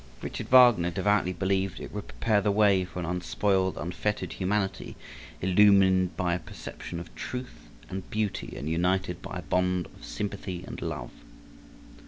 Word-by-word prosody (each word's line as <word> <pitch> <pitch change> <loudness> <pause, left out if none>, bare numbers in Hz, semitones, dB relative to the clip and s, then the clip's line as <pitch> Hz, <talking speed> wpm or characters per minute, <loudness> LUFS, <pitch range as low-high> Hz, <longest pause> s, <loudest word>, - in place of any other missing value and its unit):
Richard - - -5
Wagner 120 -9 +7
devoutly 105 +1 +1
believed 95 +1 -1
it - - -8
would 105 -1 -5
prepare 110 -3 +1
the 105 - +1
way 100 -3 +4
for 90 0 -11
an 90 - -2
unspoiled, 95 +2 0
unfettered 90 +6 -2
humanity, 95 +1 -2 0.5
illumined 95 -1 +5
by 90 -1 +1
a 90 - -1
perception 85 +1 -8
of 85 -1 -10
Truth 125 - -7 0.2
and 95 -1 -6
Beauty 110 -2 -2
and 75 - -5
united 90 +2 0
by 95 -1 -6
a - - -4
bond 90 +2 +1
of - - -17
sympathy 95 -3 -5
and - - -8
love. - - -4
95 Hz, 155 wpm, -28 LUFS, 90-100 Hz, 0.5 s, Wagner